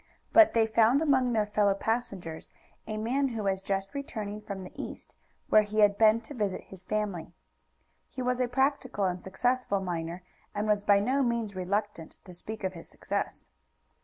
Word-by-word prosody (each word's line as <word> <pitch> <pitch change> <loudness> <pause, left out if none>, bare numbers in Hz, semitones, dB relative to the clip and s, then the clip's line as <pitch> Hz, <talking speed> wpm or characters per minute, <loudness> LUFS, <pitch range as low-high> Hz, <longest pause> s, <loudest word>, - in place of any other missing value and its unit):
But 330 -6 +7
they 225 -1 +5
found 225 +4 +4
among 265 -5 +3
their 215 -2 +2
fellow 205 -1 +2
passengers 200 -7 -3 0.4
a 215 0 -3
man 255 +6 +1
who 225 -4 -4
was 190 -1 0
just 195 +2 -2
returning 215 -7 -5
from 200 -2 -6
the 180 - -9
East, - - -8 0.3
where 215 - +7
he 215 +1 0
had 205 -1 +5
been 220 +1 +5
to 230 +6 -10
visit 205 -7 -2
his 190 -1 -14
family. 200 -6 -3 0.7
He 255 - -6
was 250 0 0
a 250 - +2
practical 260 -4 0
and 180 -1 -2
successful 245 +1 0
miner, 175 -1 -4 0.3
and 205 +1 -1
was 210 -1 +2
by 205 -1 +5
no 260 +7 +1
means 235 -5 -1
reluctant 190 -2 -3
to 180 - -11
speak 215 +5 -7
of 190 0 -1
his 165 - -11
success. - - -4
210 Hz, 180 wpm, -29 LUFS, 195-240 Hz, 0.7 s, But